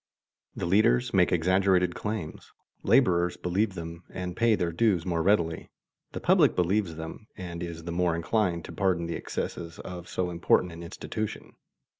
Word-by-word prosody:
The -, -, -3 dB
leaders 85 Hz, -, +3 dB
make -, -, +4 dB
exaggerated 90 Hz, +1 st, +3 dB
claims; 105 Hz, -7 st, -5 dB, 0.3 s
laborers 90 Hz, -9 st, +3 dB
believe 95 Hz, +3 st, 0 dB
them 85 Hz, 0 st, -7 dB
and 90 Hz, -1 st, -5 dB
pay 115 Hz, 0 st, +3 dB
their 90 Hz, -4 st, -1 dB
dues 95 Hz, -2 st, +2 dB
more 85 Hz, -2 st, 0 dB
readily; 85 Hz, -3 st, +1 dB, 0.4 s
the -, -, -4 dB
public -, -, +4 dB
believes 90 Hz, -1 st, +1 dB
them 80 Hz, +7 st, -8 dB
and 85 Hz, -3 st, -6 dB
is 85 Hz, -1 st, -6 dB
the 85 Hz, -, -5 dB
more 85 Hz, -1 st, +1 dB
inclined 85 Hz, 0 st, 0 dB
to -, -, -9 dB
pardon 95 Hz, -4 st, 0 dB
the 85 Hz, -, -3 dB
excesses 85 Hz, -1 st, -5 dB
of 90 Hz, -1 st, -8 dB
so 90 Hz, -1 st, -2 dB
important 85 Hz, +1 st, +2 dB
an 85 Hz, +1 st, -9 dB
institution. 105 Hz, +5 st, -5 dB
90 Hz, 160 wpm, -28 LUFS, 85-95 Hz, 0.4 s, make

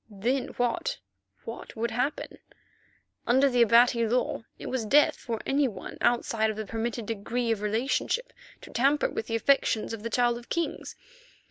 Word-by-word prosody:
Then 235 Hz, +6 st, -1 dB
what—what 100 Hz, -, -5 dB
would 230 Hz, +1 st, -2 dB
happen? 255 Hz, +6 st, -2 dB, 0.9 s
Under 265 Hz, +4 st, +5 dB
the 245 Hz, -2 st, +2 dB
Abati 235 Hz, 0 st, +5 dB
law 245 Hz, +1 st, 0 dB, 0.2 s
it -, -, -9 dB
was 255 Hz, -3 st, -2 dB
death 285 Hz, +7 st, +4 dB
for 230 Hz, -2 st, -5 dB
any 280 Hz, 0 st, +2 dB
one 195 Hz, -6 st, -8 dB
outside 230 Hz, -2 st, +2 dB
of 215 Hz, -, -3 dB
the 220 Hz, -, -4 dB
permitted 225 Hz, +2 st, -3 dB
degree 230 Hz, +3 st, -2 dB
of 220 Hz, -2 st, -1 dB
relationship 255 Hz, -, -1 dB, 0.3 s
to -, -, -12 dB
tamper 275 Hz, +4 st, +2 dB
with 220 Hz, -, -4 dB
the 225 Hz, -, -1 dB
affections 230 Hz, -2 st, +2 dB
of 225 Hz, -, -6 dB
the 230 Hz, -, -4 dB
Child 240 Hz, 0 st, +1 dB
of 240 Hz, -, -17 dB
Kings. 335 Hz, -1 st, -3 dB
235 Hz, 160 wpm, -27 LUFS, 220-250 Hz, 0.9 s, Under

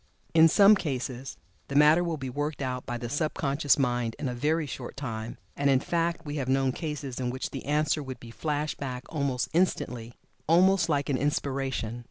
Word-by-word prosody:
In 165 Hz, 0 st, +8 dB
some 200 Hz, +5 st, +7 dB
cases 135 Hz, -8 st, -3 dB, 0.3 s
the 140 Hz, -, -6 dB
matter 150 Hz, +4 st, +6 dB
will 170 Hz, -2 st, -2 dB
be 135 Hz, -2 st, -5 dB
worked 145 Hz, +3 st, -3 dB
out 125 Hz, -1 st, -4 dB
by 120 Hz, -2 st, -2 dB
the 120 Hz, 0 st, -5 dB
sub 150 Hz, +5 st, -1 dB
conscious 140 Hz, 0 st, +2 dB
mind 120 Hz, -4 st, 0 dB
in 145 Hz, -, -3 dB
a 125 Hz, -, -2 dB
very 155 Hz, +6 st, 0 dB
short 130 Hz, -3 st, -7 dB
time, 115 Hz, -5 st, -5 dB, 0.2 s
and 140 Hz, 0 st, +1 dB
in 135 Hz, -1 st, +4 dB
fact 170 Hz, +2 st, -1 dB
we 145 Hz, 0 st, -4 dB
have 130 Hz, -2 st, -2 dB
known 135 Hz, 0 st, +2 dB
cases 145 Hz, -4 st, -5 dB
in 125 Hz, -1 st, -1 dB
which 130 Hz, +2 st, -4 dB
the 135 Hz, -, -6 dB
answer 150 Hz, +1 st, +1 dB
would 130 Hz, -3 st, -7 dB
be 115 Hz, 0 st, -11 dB
flashed 150 Hz, +3 st, -2 dB
back 130 Hz, -2 st, -4 dB
almost 140 Hz, -5 st, -1 dB
instantly, 125 Hz, -9 st, 0 dB, 0.3 s
almost 180 Hz, +2 st, +4 dB
like 145 Hz, -2 st, 0 dB
an 135 Hz, -, +2 dB
inspiration. 135 Hz, -5 st, -2 dB
140 Hz, 200 wpm, -28 LUFS, 125-155 Hz, 0.3 s, In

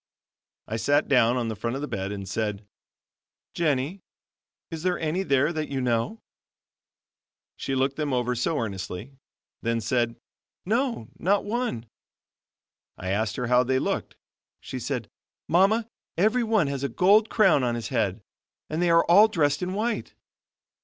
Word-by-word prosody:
I 110 Hz, -, -3 dB
sat 145 Hz, +6 st, +2 dB
down 125 Hz, -2 st, +4 dB
on 120 Hz, -2 st, -1 dB
the 110 Hz, -, -3 dB
front 115 Hz, +4 st, -3 dB
of 140 Hz, -, -4 dB
the -, -, -2 dB
bed 95 Hz, -4 st, -3 dB
and 100 Hz, -1 st, -6 dB
said: 105 Hz, +1 st, -3 dB, 0.9 s
"Jennie, 155 Hz, +3 st, 0 dB, 0.7 s
is 165 Hz, -1 st, -5 dB
there 180 Hz, +1 st, +1 dB
any 160 Hz, +3 st, -1 dB
there 140 Hz, -1 st, +2 dB
that 155 Hz, -1 st, -3 dB
you 135 Hz, -, -2 dB
know?" 125 Hz, -, -1 dB, 1.3 s
She 135 Hz, -, -3 dB
looked 135 Hz, +1 st, 0 dB
them 150 Hz, -2 st, -1 dB
over 125 Hz, -1 st, 0 dB
so 125 Hz, +6 st, -1 dB
earnestly, 100 Hz, +1 st, -5 dB, 0.5 s
then 115 Hz, 0 st, 0 dB
said: 120 Hz, +1 st, 0 dB, 0.5 s
"No, 230 Hz, -, -1 dB
not 200 Hz, +3 st, +2 dB
one." 220 Hz, -, -2 dB, 1.1 s
I 95 Hz, -, -5 dB
asked 105 Hz, +1 st, 0 dB
her 125 Hz, -, -2 dB
how 125 Hz, +1 st, +4 dB
they 130 Hz, +1 st, +1 dB
looked. -, -, -2 dB, 0.4 s
She -, -, -6 dB
said: -, -, -3 dB, 0.4 s
"Mama, 200 Hz, +7 st, +3 dB, 0.3 s
every 220 Hz, +7 st, +3 dB
one 220 Hz, -6 st, +2 dB
has 140 Hz, -1 st, -3 dB
a 140 Hz, -, 0 dB
gold 200 Hz, -, +4 dB
crown 190 Hz, -, +4 dB
on 120 Hz, -1 st, 0 dB
its 115 Hz, -, -4 dB
head, 100 Hz, +2 st, -1 dB, 0.5 s
and 155 Hz, +2 st, -1 dB
they 175 Hz, -, +3 dB
are 165 Hz, 0 st, +5 dB
all 200 Hz, +6 st, +7 dB
dressed 145 Hz, -8 st, +1 dB
in 180 Hz, +1 st, -2 dB
white." 230 Hz, +3 st, -2 dB
140 Hz, 160 wpm, -26 LUFS, 115-180 Hz, 1.3 s, all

